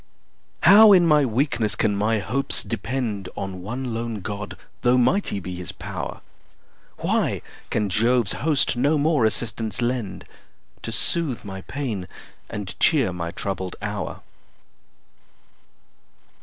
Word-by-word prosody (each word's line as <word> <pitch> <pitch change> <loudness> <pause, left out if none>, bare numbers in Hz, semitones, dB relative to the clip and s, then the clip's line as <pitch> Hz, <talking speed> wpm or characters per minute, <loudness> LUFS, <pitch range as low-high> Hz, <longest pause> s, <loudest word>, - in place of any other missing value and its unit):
How 210 +3 +9
in 180 -2 +6
my 150 -3 +5
weakness 115 -3 0
can 105 -2 +1
my 105 +2 +1
hopes 125 +8 0
depend 110 -3 -3
On 95 -1 -5
one 120 +5 -4
lone 115 -2 -3
God, 105 +1 -6 0.2
though 125 +1 +4
mighty 125 - +2
be 90 -1 -6
his 90 -3 -4
pow'r? - - -6 0.8
Why - - 0 0.3
can 105 - 0
Jove's 115 +2 +2
host 145 -4 +2
no 145 +5 +2
more 145 -4 +2
assistance 110 -1 0
lend, 120 -7 -2 0.6
To - - -5
soothe 135 -10 0
my 95 -1 -6
pains, 115 -8 -4 0.4
and 105 -3 -5
cheer 135 - +3
my 85 -1 -4
troubled 95 0 -4
hour? 105 -1 -4
115 Hz, 125 wpm, -23 LUFS, 100-135 Hz, 0.8 s, How